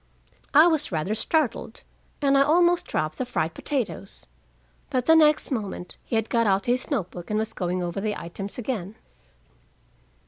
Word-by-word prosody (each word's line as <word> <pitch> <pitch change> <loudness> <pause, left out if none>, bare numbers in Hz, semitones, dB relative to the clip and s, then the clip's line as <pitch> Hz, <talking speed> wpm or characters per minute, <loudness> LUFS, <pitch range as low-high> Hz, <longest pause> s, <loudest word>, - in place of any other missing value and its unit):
I 305 +3 +9
was 315 -6 +1
rather 165 +5 -1
startled, 245 0 -1 0.4
and 275 0 +4
I 275 - +5
almost 345 +4 +3
dropped 155 0 -2
the - - +1
fried 160 -8 -1
potatoes. 240 -8 -4 0.6
But 255 -4 -1
the 320 - +6
next 305 -2 +4
moment 200 -7 -4
he - - -4
had 225 0 +1
got 230 -2 +1
out 195 0 +2
his 245 +1 0
note 210 - -1
book 175 -1 -9
and 210 - 0
was 220 +1 -2
going 180 0 -2
over 175 +2 -3
the 210 0 -1
items 195 +4 -7
again. 220 -5 -4
220 Hz, 170 wpm, -25 LUFS, 190-280 Hz, 0.6 s, I